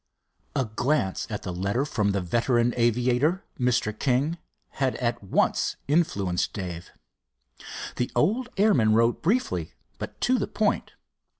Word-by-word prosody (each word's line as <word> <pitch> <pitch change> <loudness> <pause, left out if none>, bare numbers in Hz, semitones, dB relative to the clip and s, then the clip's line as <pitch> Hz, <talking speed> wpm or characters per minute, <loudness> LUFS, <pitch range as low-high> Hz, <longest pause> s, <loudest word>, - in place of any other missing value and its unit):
A 135 - +1
glance 110 -1 0
at 105 -2 -4
the 90 - -4
letter 100 +9 0
from 105 -8 0
the 100 -1 0
veteran 120 +6 +1
aviator, 125 - +2
Mr. 125 -3 +1
King, 140 +6 +1 0.3
had 135 -2 -1
at 120 -3 -2
once 95 - +1
influenced 100 - +1
Dave. 90 -3 -6 1.1
The 125 - 0
old 230 - +2
airman 130 - +4
wrote 115 +1 +3
briefly, 250 - 0 0.2
but - - -7
to 255 0 +3
the - - -1
point. 210 0 0
120 Hz, 130 wpm, -26 LUFS, 105-150 Hz, 1.1 s, airman